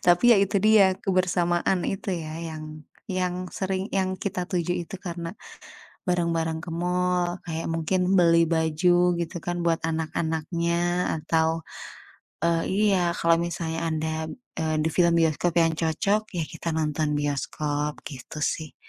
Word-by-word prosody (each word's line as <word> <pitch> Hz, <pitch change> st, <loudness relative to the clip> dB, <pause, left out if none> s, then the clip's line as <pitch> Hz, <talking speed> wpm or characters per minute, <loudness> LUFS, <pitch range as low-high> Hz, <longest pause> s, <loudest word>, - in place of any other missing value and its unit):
Tapi 175 Hz, +8 st, +6 dB
ya -, -, +4 dB
itu 200 Hz, +1 st, +2 dB
dia 210 Hz, -3 st, +6 dB
kebersamaan 180 Hz, -1 st, +1 dB
itu 195 Hz, -1 st, -2 dB
ya 160 Hz, -1 st, -5 dB
yang 155 Hz, -2 st, -7 dB, 0.2 s
yang 185 Hz, -1 st, -2 dB
sering 190 Hz, 0 st, -2 dB
yang 185 Hz, -1 st, 0 dB
kita 185 Hz, -2 st, -3 dB
tuju 175 Hz, -1 st, 0 dB
itu 195 Hz, -, -7 dB
karena 170 Hz, -1 st, -6 dB, 0.7 s
bareng-bareng 165 Hz, -2 st, 0 dB
ke 175 Hz, -, -7 dB
mall 180 Hz, +1 st, 0 dB
kayak 165 Hz, -1 st, -4 dB
mungkin 180 Hz, +3 st, +1 dB
beli 170 Hz, -2 st, +5 dB
baju 175 Hz, +2 st, +3 dB
gitu 170 Hz, 0 st, -4 dB
kan 175 Hz, 0 st, -2 dB
buat 170 Hz, -1 st, +2 dB
anak-anaknya 170 Hz, +2 st, -1 dB
atau, 160 Hz, +1 st, +1 dB, 0.8 s
eee, 170 Hz, 0 st, +2 dB, 0.3 s
iya 195 Hz, -, +3 dB, 0.2 s
kalau 170 Hz, -1 st, +3 dB
misalnya 170 Hz, -1 st, -2 dB
ada, 160 Hz, 0 st, -1 dB, 0.4 s
eee, 160 Hz, -1 st, 0 dB
di 160 Hz, -, +1 dB
film 170 Hz, +1 st, +3 dB
bioskop 165 Hz, +1 st, +1 dB
yang 165 Hz, -1 st, +1 dB
cocok 170 Hz, +6 st, +1 dB
ya 175 Hz, -, -1 dB
kita 165 Hz, -, -4 dB
nonton 155 Hz, -1 st, 0 dB
bioskop, 145 Hz, +1 st, -2 dB
gitu 140 Hz, +1 st, -8 dB
sih. 155 Hz, 0 st, -2 dB
170 Hz, 140 wpm, -25 LUFS, 160-180 Hz, 0.8 s, Tapi